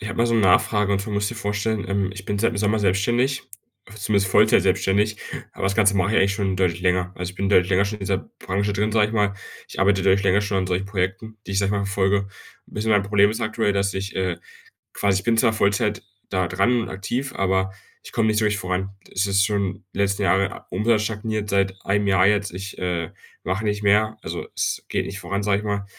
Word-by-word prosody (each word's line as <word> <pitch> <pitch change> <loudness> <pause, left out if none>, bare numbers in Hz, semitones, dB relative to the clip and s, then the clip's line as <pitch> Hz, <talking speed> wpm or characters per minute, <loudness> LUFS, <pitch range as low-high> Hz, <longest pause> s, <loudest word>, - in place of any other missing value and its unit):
ich 110 - -5
habe - - -6
mal 120 - +3
so 115 - +1
'ne 115 - +3
Nachfrage 100 +2 +3
und 100 - +2
zwar 105 +2 -5
musst 105 0 0
du - - -6
dir 115 - -8
vorstellen, 105 +1 -2
ähm, 100 -1 0
ich 95 0 -10
bin 100 - -1
seit 115 +3 +2
dem 105 - -5
Sommer 105 +1 +1
selbstständig 120 +8 +1 0.5
zumindest 100 -2 0
Vollzeit - - +5
selbstständig, 105 +2 +1 0.4
aber - - -5
das 100 - +1
Ganze 100 -2 +3
mache 95 +2 +1
ich - - +2
eigentlich 100 0 +3
schon 100 -2 -1
deutlich 90 -2 0
länger, 90 0 +1
also, 90 0 -4
ich - - -16
bin 95 +1 -2
deutlich 90 -2 +4
länger 95 +1 +3
schon 105 +2 -4
in - - -17
dieser 95 - 0 0.2
Branche 100 +2 -1
drin, 105 +2 0
sage 105 -1 +4
ich - - -7
mal. 105 -2 +1 0.3
Ich - - -7
arbeite 95 0 +3
deutlich 95 +1 +3
länger 100 +1 +3
schon 100 -1 -1
an 95 - -1
solchen 90 +1 -1
Projekten, 100 +3 -3
die - - -5
ich, 95 - +1
sage 100 -1 +1
ich - - 0
mal, 100 -1 0
verfolge. 100 0 +1 0.4
Ein - - -17
bisschen 110 +1 -1
mein 105 -1 +4
Problem 100 0 +3
ist 110 - -4
aktuell, 110 -1 0
dass 100 0 0
ich, 95 +1 -4
äh, 90 -2 -1 0.6
quasi 100 -2 +1
ich - - -16
bin 115 -1 +2
zwar 110 0 +3
Vollzeit 105 0 +1 0.3
da 95 -2 0
dran 105 +8 +2
und 115 - -6
aktiv, 120 +8 -3
aber 95 0 0 0.3
ich - - -11
komme 115 - +1
nicht 110 0 +2
so 110 - +2
richtig 105 0 0
voran. 95 +1 -2 0.2
Es 95 +2 +1
ist 100 0 +3
schon 100 -2 -2
die - - -7
letzten 100 0 +1
Jahre, 100 -1 +1
U - - -3
Umsatz 110 0 +2
stagniert 110 -1 -3
seit 95 -1 +1
einem 105 +1 +1
Jahr 95 -1 +4
jetzt. 100 -1 +1
Ich, 95 +3 -7
äh, 85 -3 -2 0.3
mache 95 +5 -2
nicht 105 0 -1
mehr 105 +2 +3
also - - -5
es - - -1
geht - - -1
nicht 100 - -6
voran, 100 +2 -3
sage 100 -1 +2
ich 105 - -7
mal, 100 -1 -2
100 Hz, 250 wpm, -23 LUFS, 95-105 Hz, 0.6 s, Vollzeit